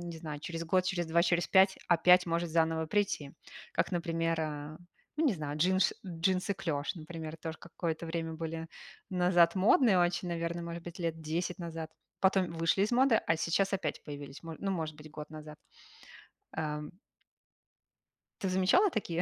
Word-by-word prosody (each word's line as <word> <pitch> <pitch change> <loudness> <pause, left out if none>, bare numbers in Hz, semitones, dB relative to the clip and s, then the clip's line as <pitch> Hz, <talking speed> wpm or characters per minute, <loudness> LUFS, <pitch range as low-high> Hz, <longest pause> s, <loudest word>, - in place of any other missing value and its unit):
не 170 -1 -6
знаю, 150 -2 -6
через 165 +1 -5
год, 185 +2 +2
через 180 -3 -1
2, 170 +1 +3
через 170 0 +2
5 190 0 +5
опять 180 +1 +6
может 170 0 -1
заново 160 0 +1
прийти. 165 -7 -1 0.4
Как, - - 0
например, 165 -1 0
а, 150 0 -4 0.4
ну 315 - +1
не 250 - +3
знаю, 150 -3 -4
джинш 185 +4 +3
джинсы-клеш, 180 -3 -1
например, 160 -1 -7
тоже 160 0 -6
какое-то 170 -1 -4
время 165 0 -3
были 165 0 -4 0.4
назад 175 -2 +4
модные 200 +2 +5
очень, 175 +1 +1
наверно, 170 0 -2
может 170 0 -6
быть, 170 0 -9
10 165 -2 -1 0.4
назад, 165 -2 -5 0.3
потом 190 -2 +3
вышли 165 +3 +2
из 205 - +1
моды, 250 -2 +4
а 160 - +3
сейчас 170 +5 +1
опять 195 - -2
появились, 145 -1 -8
мо 165 -1 -7
ну, 195 - -2
может 160 -5 -3
быть, 155 0 -12
год 150 0 -8
назад. 155 -1 -10 0.9
Ам. 150 -1 -3 1.5
Ты 190 - 0
замечала 190 - +4
такие 175 - -2
170 Hz, 160 wpm, -31 LUFS, 160-185 Hz, 1.5 s, опять